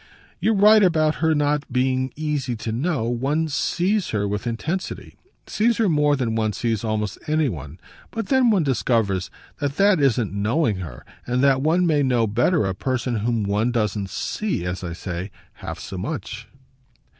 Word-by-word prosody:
"You're 225 - +2
right 210 +2 +6
about 155 -5 +3
her 160 -1 +3
not 145 -1 0
being 130 +1 +1
easy 150 -5 -2
to 110 0 -4
know. 135 +3 -1
One 135 +7 0
SEES 180 +6 0
her 100 -2 -1
with 105 +4 -3
intensity 155 +11 -4 0.3
sees 230 +1 +1
her 225 - +2
more 150 -3 +3
than 125 -5 -1
one 110 -1 0
sees 115 -2 -1
almost 105 -2 -2
any 155 -2 +2
one; 75 - -8 0.3
but 225 0 -5
then 260 -3 +4
one 200 -6 +3
discovers 115 -8 0 0.3
that 145 -1 -2
that 200 -3 +4
isn't 125 -7 +1
knowing 110 - +1
her 85 -10 -8 0.2
and 125 +2 +1
that 135 -1 +4
one 165 +5 +2
may 155 -4 +2
know 125 -4 +2
better 120 - +2
a 95 - -1
person 125 +3 -2
whom 115 +1 0
one 105 +4 0
doesn't 105 -4 -1
'see,' 205 - -2
as 90 +1 -4
I 85 -2 -4
say, 90 +2 -5 0.3
half - - -6
so 95 - -7
much." 115 - -5
130 Hz, 175 wpm, -23 LUFS, 110-155 Hz, 0.3 s, right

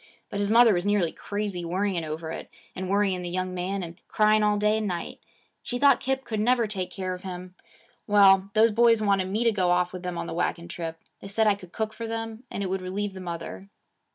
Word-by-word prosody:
But 200 - -3
his 205 0 0
mother 230 0 +7
was 175 -1 0
nearly 200 -5 +2
crazy 205 -3 -4
worrying 180 0 -1
over 160 +1 -5
it, - - -7 0.3
and 185 0 -4
worrying 195 -2 +1
the 175 - -4
young 185 +1 -2
man 185 +2 -2
and 170 +1 -9
crying 215 0 +3
all 210 0 +3
day 210 +1 +2
and 215 - -2
night. 175 -3 -4 0.4
She 245 - -3
thought 275 -1 +5
Kip 265 0 -1
never 235 +3 +2
could 215 - -3
take 185 -3 -2
care 185 0 -4
of 180 - -8
him. 185 -1 -7 0.5
Well, 195 -2 +6
those 220 +1 +5
boys 230 +1 +5
wanted 195 -2 +2
me 215 +4 0
to 230 - +4
go 185 -4 +1
off 180 0 +2
with 180 - -6
them 180 -1 -4
on - - -3
the - - -5
wagon 170 0 -2
trip. 165 -1 -6 0.2
They - - -9
said 220 +3 +1
I 210 - +5
could 185 -3 -11
cook 220 -1 -3
for 230 +1 -6
them, 225 +1 -5
and 200 - -4
it - - -1
would 190 0 -2
relieve 195 +2 -3
the 190 - -8
mother. 170 +1 -6
195 Hz, 240 wpm, -26 LUFS, 180-215 Hz, 0.5 s, mother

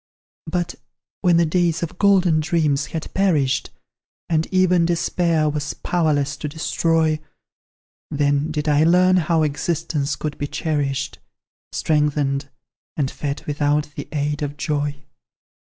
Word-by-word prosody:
But, 175 +1 -2 0.5
when 175 -3 +4
the 170 - +4
days 170 0 +1
of 170 +2 -5
golden 190 -5 +4
dreams 155 -3 +1
had 160 - -6
perished, 155 -9 +1 0.6
And 160 -1 +1
even 185 -2 +3
Despair 170 -1 +1
was 150 -1 -2
powerless 150 -4 0
to 150 - -4
destroy; 160 0 +1 0.9
Then 145 +1 +1
did 155 0 -3
I 150 0 +4
learn 180 +2 +5
how 165 -2 +2
existence 150 -1 -1
could 150 -1 -5
be 145 - -2
cherished, 145 -2 -2 0.5
Strengthened, 145 -2 0 0.5
and 140 -3 0
fed 145 -1 -4
without 150 0 0
the - - -6
aid 150 0 -1
of 145 0 -3
joy. 145 -1 -2
155 Hz, 125 wpm, -21 LUFS, 145-170 Hz, 0.9 s, learn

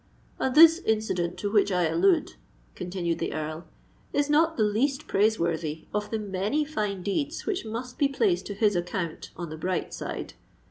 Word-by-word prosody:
"And 260 - 0
this 325 +2 +9
incident 215 - -1
to 205 - -3
which 205 -1 +3
I 180 -1 +2
allude," 345 - +2 0.4
continued 175 -2 -3
the - - -2
Earl, 155 +2 -5 0.4
"is 290 0 +1
not 320 +2 +3
the 220 - +3
least 265 +8 +1
praiseworthy 170 -7 0
of 210 0 -2
the 225 - -1
many 210 +8 -1
fine 210 -10 -3
deeds 285 - -2
which 395 - -2
must 240 +3 -6
be 285 - +4
placed 350 +6 +1
to 205 - -5
his 205 -1 +2
account 175 -1 -3
on 170 -3 -5
the 155 - -6
bright 185 +2 -2
side. - - -5
210 Hz, 175 wpm, -27 LUFS, 180-285 Hz, 0.4 s, this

